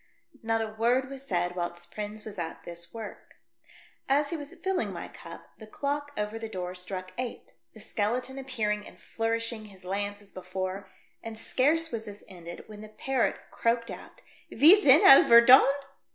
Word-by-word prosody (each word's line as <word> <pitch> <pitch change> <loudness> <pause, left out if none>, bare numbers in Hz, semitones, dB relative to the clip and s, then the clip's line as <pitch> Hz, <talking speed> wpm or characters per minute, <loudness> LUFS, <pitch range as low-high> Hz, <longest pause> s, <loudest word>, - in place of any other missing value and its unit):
Not 225 0 0
a 220 -1 -6
word 245 +4 +1
v/as 275 0 -9
said 175 -1 -1
whilst 175 -1 -5
Prins 210 0 -6
was 210 -3 -8
at 165 -1 -5
this 170 0 -7
work. 225 -2 -9 0.7
As 285 +1 +2
he - - -1
was 290 -2 -7
filling 380 -1 -2
my - - -6
cup, - - -12
the 220 - -11
clock 285 +5 -3
over 210 +2 -3
the 225 -1 -6
door 180 -3 -5
struck 185 0 -6
eight, 250 -2 -6 0.2
the - - -12
skeleton 250 +5 -2
appearing 210 -6 -2
and - - -15
flourishing 230 0 -3
his 195 -3 -14
lance 205 +2 -3
as 205 -1 -16
before, 185 +1 -5 0.3
and 225 -1 -7
scarce 310 +8 +1
was 225 -2 -4
this 205 -1 -10
ended 175 -2 -10
when 210 -1 -11
the 215 - -10
parrot 250 +4 -1
croaked 230 0 0
out, - - -11 0.3
"Ms 335 - +7
3i'n 280 +3 +7
al 270 - +9
Wei 235 0 +10
J)oniO!" 260 +2 +8
220 Hz, 180 wpm, -28 LUFS, 195-255 Hz, 0.7 s, Wei